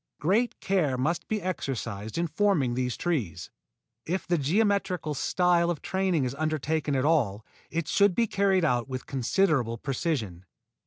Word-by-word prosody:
Great 215 +10 +1
care 165 -9 +1
must 155 +7 -1
be 220 - -1
exercised 120 - -4
in 170 - +1
forming 160 -6 +1
these 125 0 -2
trees. 105 - -2 0.5
If 185 +4 -2
the 175 -2 +1
geometrical 185 0 +1
style 175 +3 +2
of 170 -4 -3
training 190 -5 0
is 125 0 -2
undertaken 155 0 -1
at 130 +1 +1
all, 115 -10 +1 0.2
it 165 -2 -2
should 200 0 +3
be 235 - +3
carried 195 -4 +2
out 125 -3 0
with 130 -1 -5
considerable 135 - +1
precision. 115 - -3
155 Hz, 150 wpm, -27 LUFS, 130-185 Hz, 0.5 s, should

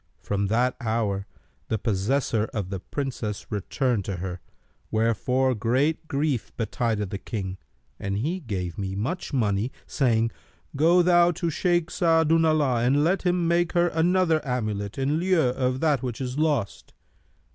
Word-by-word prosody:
From 100 0 -1
that 120 +4 +1
hour 110 -4 -1 0.4
the 110 - 0
possessor[FN#293] 110 +2 0
of 100 -4 -2
the 95 - -3
Princess 115 -3 -4
returned 110 +2 -1
to 100 - -3
her, 90 0 -5 0.5
wherefore 125 +4 +1
great 130 +9 0
grief 140 -5 -1
betided 110 -3 -1
the 100 - -4
King 95 -5 -5 0.4
and 100 0 -2
he 160 - -1
gave 95 - -4
me 95 -1 -3
much 135 - -3
money, 110 -3 0
saying, 115 -4 +1 0.4
'Go 170 +5 +5
thou 175 0 +5
to 170 0 -2
Shaykh 175 +1 +1
Sa'adu'llah 160 -6 +3
and 140 +4 +3
let 180 +5 +2
him 175 -1 +2
make 170 0 +2
her 175 0 +3
another 165 0 +2
amulet, 110 -6 -3
in 140 +4 +1
lieu 185 0 +2
of 130 0 -1
that 150 -6 +2
which 125 -3 -4
is 125 -1 -3
lost.' 145 -9 -1
125 Hz, 145 wpm, -25 LUFS, 105-160 Hz, 0.5 s, Go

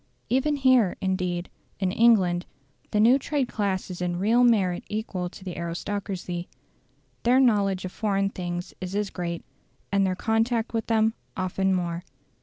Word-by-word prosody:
Even 265 +4 +2
here, 255 -8 +4
indeed, 180 -2 -1 0.3
in 190 -2 +1
England 190 -6 +4 0.4
the 210 - +1
new 240 +5 +6
trade 280 -1 -1
class 195 -5 -2
is 180 - -7
in 175 -1 -1
real 225 +6 +3
merit 195 -7 +3
equal 205 -4 -3
to 190 - -13
the 180 - -5
aristocracy. 175 0 -4 0.7
Their 250 +2 +4
knowledge 200 -7 +3
of 185 - -5
foreign 195 -2 0
things 175 -1 -5
is 185 +1 -4
as 205 -1 -1
great, 170 -2 -4 0.5
and 200 0 +3
their 185 -1 +1
contact 225 +2 0
with 225 -1 -1
them 220 -1 +3 0.2
often 190 +1 +1
more. 175 -1 -2
195 Hz, 155 wpm, -26 LUFS, 180-225 Hz, 0.7 s, new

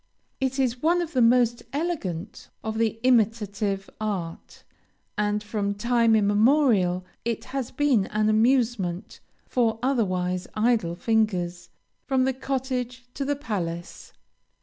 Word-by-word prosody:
It 265 0 -1
is 255 -2 0
one 340 +3 +3
of 340 -2 -3
the 255 - +2
most 240 0 +4
elegant 230 - -4
of 220 0 -3
the 225 -1 0
imitative 210 -5 +1
art, 185 -6 -5 0.5
and 210 0 0
from 205 -1 -2
time 230 +1 +3
immemorial 205 -3 +3 0.2
it 230 -1 -2
has 265 -3 -2
been 260 -7 +2
an 215 0 0
amusement 220 -5 +1 0.3
for 230 -3 +1
otherwise 185 -8 0
idle 215 -6 +1
fingers, 180 -5 0 0.4
from 265 -2 +2
the 265 0 +1
cottage 255 -1 -3
to 280 - -3
the 285 +1 0
palace. 175 - -5
225 Hz, 125 wpm, -25 LUFS, 200-255 Hz, 0.5 s, most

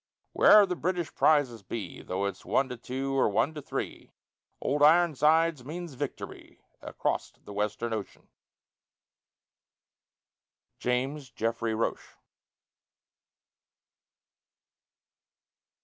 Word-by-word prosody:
Wherever 210 -1 +7
the 180 -2 -3
British 175 -1 -2
prizes 140 -8 +3
be, 105 +3 -6
Though 95 +2 -2
it's 100 -2 -4
one 135 -1 +1
to 125 - -5
two, 135 +3 -3
or 135 - +3
one 130 +9 +1
to 150 - -7
three, - - -5 0.5
"Old 145 +1 -1
Ironsides" 160 -1 +4
means 165 +3 -6
victory, 130 - -7 0.2
Acrost - - -3
the 105 - -9
Western 105 +3 -2
ocean. 110 -2 -6 2.5
JAMES 130 +3 -1
JEFFREY 115 -1 -2
ROCHE. 115 - -3
135 Hz, 95 wpm, -28 LUFS, 115-155 Hz, 2.5 s, Wherever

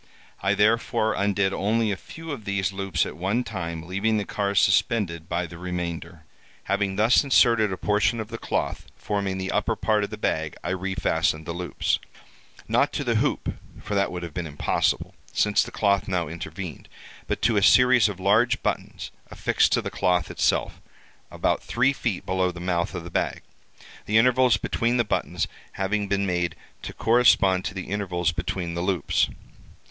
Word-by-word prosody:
I 95 +2 +2
therefore 110 +1 +2
undid 100 -1 +1
only 110 +2 +1
a - - 0
few 165 - -9
of 130 -6 -6
these 100 -2 -1
loops 95 -4 0
at - - -7
one 95 +9 0
time, 85 -7 -5
leaving 100 +5 0
the 105 - -1
car 100 -1 -2
suspended 95 -4 +2
by 85 +1 -1
the 85 0 -10
remainder. 90 -2 -5 0.4
Having 100 -1 0
thus 110 +7 +4
inserted 115 -6 +4
a 95 - -3
portion 105 +3 +1
of 110 -1 -5
the 115 -1 -6
cloth - - -2
forming 100 -2 -2
the 95 0 -3
upper - - 0
part 105 -1 +1
of 100 - -3
the 105 - -7
bag, 80 -7 -1
I 85 - -2
refastened 90 -4 0
the 85 - -4
loops—not 90 +1 -3
to - - -2
the - - 0
hoop, - - -1 0.3
for - - -6
that 100 -1 +1
would 90 -1 -5
have 85 -3 -7
been 90 -2 -3
impossible, 75 -1 0 0.2
since 105 -1 +3
the - - -3
cloth 100 -1 +1
now 90 -4 -1
intervened—but 85 +1 -7
to 115 -3 +3
a - - +3
series 125 +1 +6
of 95 -3 -7
large 115 +6 +2
buttons, - - -3 0.2
affixed - - +1
to - - +2
the - - -4
cloth 90 -3 +1
itself, - - 0 0.5
about - - 0
three 130 +3 +1
feet 115 -8 -3
below 95 0 +1
the 90 -1 -8
mouth 90 +1 -1
of 85 - -4
the 85 - -9
bag, - - -1 0.6
the 110 - +3
intervals 125 +1 +4
between 120 +2 0
the 120 - +3
buttons 105 - -1 0.3
having 100 +1 -1
been 100 0 0
made 90 -2 -1 0.3
to - - -6
correspond 110 -6 +4
to 105 -1 -4
the 95 - -4
intervals 90 -5 0
between 85 +1 -3
the 85 - -3
loops. 90 -4 +1
100 Hz, 175 wpm, -25 LUFS, 90-110 Hz, 0.6 s, series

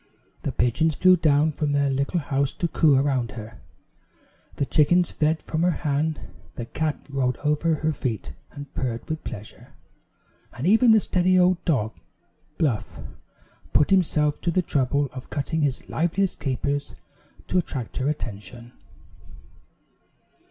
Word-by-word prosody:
The - - -2
pigeons 150 +6 +1
flew 185 0 +6
down 155 -2 +3
from 150 -1 -1
their 140 -1 +2
little 140 +6 0
house 140 -2 -1
to 175 - -1
coo 155 -3 +3
around 130 -5 +1
her; 110 0 -10 0.9
the 140 - 0
chickens 175 +5 +3
fed 155 +1 0
from 160 - -2
her 175 - +3 0.2
hand; 150 +2 0 0.3
the 120 - -5
cat 155 +4 -2
rolled 135 -3 -1
over 150 +2 +2
her 155 +1 -1
feet 110 - -4 0.2
and 145 0 -10
purred 120 -3 -3
with 160 0 -4
pleasure; 105 +1 -10 0.8
and 125 - -5
even 225 +6 +5
the 220 -1 +7
steady 185 -2 +2
old 180 0 +3
dog, 110 -9 +1 0.6
Bluff, 130 -9 -1 0.7
put 150 - +3
himself 155 -5 +2
to - - 0
the 180 +2 +1
trouble 140 -1 +1
of 130 -1 -9
cutting 160 +2 -2
his 140 -3 -1
liveliest 180 +4 0
capers 140 +1 -2 0.5
to 185 - +2
attract 130 -9 -5
her 135 +2 0
attention. 120 -3 -6
145 Hz, 145 wpm, -24 LUFS, 130-160 Hz, 0.9 s, the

